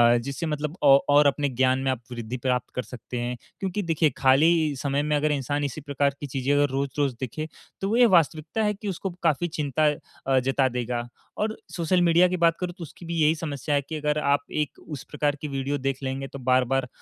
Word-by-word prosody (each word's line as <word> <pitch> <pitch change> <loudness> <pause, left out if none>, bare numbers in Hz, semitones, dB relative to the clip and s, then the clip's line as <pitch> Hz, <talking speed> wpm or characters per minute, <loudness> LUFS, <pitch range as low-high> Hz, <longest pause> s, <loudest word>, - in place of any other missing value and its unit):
अ, - - +4
जिससे 135 +6 -4
मतलब 150 0 -3
औ 140 -1 +8 0.2
और 145 - +6
अपने 140 0 +1
ज्ञान 130 +1 +2
में 135 0 0
आप 130 -3 -3
वृद्धि 120 0 -5
प्राप्त 125 0 -1
कर 125 - -1
सकते 125 +2 -8
हैं। 120 +1 -2 0.2
क्योंकि 195 +1 -2
देखिए, 165 -2 +2
खाली 150 +3 +4
समय 140 +1 -1
में 150 0 +1
अगर 150 +1 +1
इंसान 145 +1 -1
इसी 140 +2 -3
प्रकार 140 -1 0
की 145 - -5
चीज़ें 135 +1 -1
अगर 145 0 +3
रोज़-रोज़ 140 0 -1
देखें, 135 +4 -4 0.4
तो 195 - -1
वो 225 - +2
ये 245 - +7
वास्तविकता 160 +6 0
है 210 0 +2
कि 210 +1 -8
उसको 190 +1 -3
काफ़ी 165 +1 +2
चिंता 155 -2 0 0.4
अ, 135 -1 +4
जता 135 +1 +2
देगा। 120 -1 -3 0.3
और 215 +1 -1 0.2
सोशल 180 +1 +2
मीडिया 175 +1 +5
की 180 0 -2
बात 170 -1 +3
करूँ, 180 -1 -3
तो 175 - -7
उसकी 165 +2 -11
भी 170 0 -4
यही 155 +1 +4
समस्या 150 -2 -2
है 140 - +2
कि 160 - -3
अगर 150 0 0
आप 140 -1 +2
एक 150 -2 -2
उस 145 -5 -6
प्रकार 145 -1 0
की 150 - -3
वीडियो 140 0 -2
देख 135 0 -2
लेंगे, 135 +1 -3
तो 140 - -9
बार-बार 130 0 +2
145 Hz, 225 wpm, -25 LUFS, 130-160 Hz, 0.4 s, औ